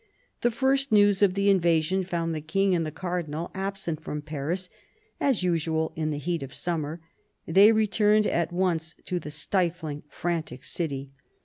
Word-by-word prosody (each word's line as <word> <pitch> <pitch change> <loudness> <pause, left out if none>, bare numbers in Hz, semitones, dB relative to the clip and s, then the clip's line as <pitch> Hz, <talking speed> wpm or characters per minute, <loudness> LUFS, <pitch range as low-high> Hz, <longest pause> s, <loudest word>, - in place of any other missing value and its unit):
The 240 - +3
first 265 +3 +1
news 205 -2 +5
of 195 -2 +4
the 200 0 +1
invasion 175 0 +2
found 170 -2 -2
the 155 - -3
King 195 +5 +1
and 170 -2 +1
the - - -4
Cardinal 170 -1 -4
absent 190 -5 -3
from 150 -2 -4
Paris 155 +5 -3 0.5
as 260 -9 +2
usual 160 -2 0
in 155 -1 -1
the 150 - -2
heat 170 +3 -2
of 135 -1 -7
summer. 160 -2 -3 0.5
They 195 +6 +7
returned 215 -1 +3
at 170 -2 0
once 175 -3 0
to 180 - -1
the 150 - -8
stifling, 160 -1 -1
frantic 165 -7 -3
city. 140 -5 -3
175 Hz, 165 wpm, -27 LUFS, 155-195 Hz, 0.5 s, They